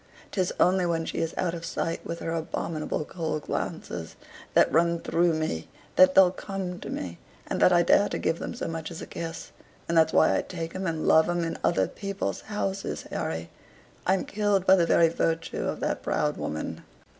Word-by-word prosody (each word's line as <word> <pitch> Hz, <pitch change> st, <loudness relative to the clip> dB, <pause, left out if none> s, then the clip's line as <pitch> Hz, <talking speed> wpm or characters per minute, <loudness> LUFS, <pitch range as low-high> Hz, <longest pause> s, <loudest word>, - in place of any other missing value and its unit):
'Tis 185 Hz, -3 st, 0 dB
only 185 Hz, +1 st, +4 dB
when 165 Hz, -2 st, 0 dB
she -, -, -3 dB
is 165 Hz, 0 st, -2 dB
out 175 Hz, -2 st, 0 dB
of 170 Hz, -1 st, -6 dB
sight 165 Hz, 0 st, -2 dB
with 170 Hz, -, -5 dB
her 165 Hz, -, -3 dB
abominable 160 Hz, -1 st, -3 dB
cold 155 Hz, -3 st, -3 dB
glances, -, -, -4 dB, 0.4 s
that -, -, +5 dB
run 170 Hz, +1 st, +3 dB
through 170 Hz, +1 st, +2 dB
me, 155 Hz, -, -2 dB, 0.3 s
that 185 Hz, 0 st, +6 dB
they'll 190 Hz, -2 st, +7 dB
come 185 Hz, -2 st, -5 dB
to -, -, -7 dB
me, 85 Hz, -2 st, -5 dB, 0.3 s
and -, -, -3 dB
that -, -, +6 dB
I 175 Hz, -1 st, +5 dB
dare 200 Hz, +4 st, +4 dB
to -, -, -2 dB
give 165 Hz, -, 0 dB
them -, -, -5 dB
so -, -, -4 dB
much 165 Hz, -1 st, -4 dB
as 170 Hz, -, -7 dB
a -, -, -5 dB
kiss; 165 Hz, -1 st, -6 dB, 0.4 s
and 170 Hz, -, -1 dB
that's 160 Hz, -1 st, +5 dB
why 160 Hz, -, +4 dB
I -, -, +2 dB
take 165 Hz, -2 st, -6 dB
'em 190 Hz, 0 st, -3 dB
and 160 Hz, -1 st, -2 dB
love 160 Hz, +2 st, +5 dB
'em 175 Hz, -1 st, 0 dB
in 165 Hz, -, -2 dB
other 95 Hz, -, +2 dB
people's 200 Hz, -1 st, -4 dB
houses, 195 Hz, -2 st, -3 dB
Harry. 80 Hz, +1 st, -3 dB, 0.6 s
I'm 190 Hz, +1 st, +2 dB
killed 205 Hz, -2 st, +1 dB
by 190 Hz, -, +7 dB
the 170 Hz, -3 st, +2 dB
very 165 Hz, -, +5 dB
virtue 165 Hz, 0 st, -1 dB
of -, -, -3 dB
that -, -, -1 dB
proud -, -, 0 dB
woman. 75 Hz, -, -4 dB
170 Hz, 200 wpm, -27 LUFS, 160-185 Hz, 0.6 s, they'll